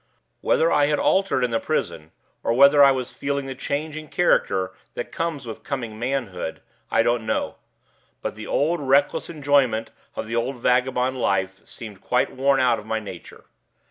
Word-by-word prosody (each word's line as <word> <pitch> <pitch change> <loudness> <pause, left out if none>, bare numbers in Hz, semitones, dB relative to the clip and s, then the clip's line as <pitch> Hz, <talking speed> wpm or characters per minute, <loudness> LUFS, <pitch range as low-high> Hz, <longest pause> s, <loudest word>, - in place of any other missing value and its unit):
Whether 165 - +2
I 145 -1 +4
had 150 0 +1
altered 195 -9 +2
in 125 - 0
the 115 - +1
prison, 75 +1 -3 0.3
or 115 - 0
whether 140 +3 +7
I 140 - +8
was 130 -2 -1
feeling 140 0 -2
the 135 - -5
change 145 +3 -3
in 155 0 -7
character 95 - +1 0.2
that 120 - -5
comes 165 -5 -3
with 115 - -7
coming 120 -6 -5
manhood, 120 -10 -3 0.3
I 115 - +3
don't 120 -1 +1
know; 110 - -2 0.7
but - - -2
the 110 0 -9
old 165 +4 +1
reckless 140 +1 +2
enjoyment 140 -7 +1 0.2
of - - -4
the 115 +1 -4
old 120 +3 -1
vagabond 125 +1 +1
life 95 -1 0
seemed 110 -6 -10
quite 125 - +1
worn 135 +1 +3
out 125 -3 +3
of 105 - -12
my 110 0 -1
nature. 95 -5 -10
130 Hz, 175 wpm, -23 LUFS, 115-140 Hz, 0.7 s, I